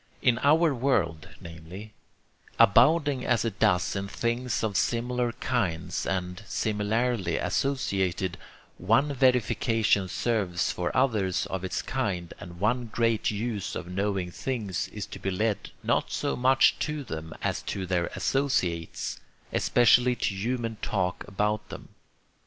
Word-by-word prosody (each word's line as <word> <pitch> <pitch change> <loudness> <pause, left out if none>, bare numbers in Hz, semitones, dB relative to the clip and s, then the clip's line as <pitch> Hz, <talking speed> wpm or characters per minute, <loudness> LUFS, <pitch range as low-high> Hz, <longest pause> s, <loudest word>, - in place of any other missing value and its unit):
In 125 -3 +3
our 155 +2 +4
world, 105 - 0
namely, 85 +6 -10 0.6
abounding 140 - +5
as 120 -1 +1
it 105 -3 -3
does 90 +1 +2
in 95 0 -3
things 120 +4 -2
of 105 -3 -1
similar 120 +2 0
kinds 90 -10 -2
and 90 0 -2
similarly 105 -3 0
associated, 95 - -1 0.4
one 135 +10 +2
verification 115 -5 +2
serves 95 -3 0
for 90 -1 -2
others 105 -9 +1
of 95 -1 -3
its 95 - -2
kind, 95 -10 -2
and 85 -1 -10
one 120 +5 +1
great 115 0 +1
use 105 -1 -3
of - - -4
knowing 95 0 -2
things 110 -5 -3
is 105 -1 -6
to - - -9
be 95 - -2
led 105 +2 -1
not - - +1
so - - -1
much 130 +2 +4
to 150 -1 -2
them 80 -8 -7
as - - -1
to 95 - -4
their 90 -1 0
associates, 95 - -1 0.3
especially 125 +1 +4
to 105 - -1
human 115 +2 -2
talk 95 -3 -1
about 105 +1 -1
them. - - -9
105 Hz, 135 wpm, -27 LUFS, 90-125 Hz, 0.6 s, abounding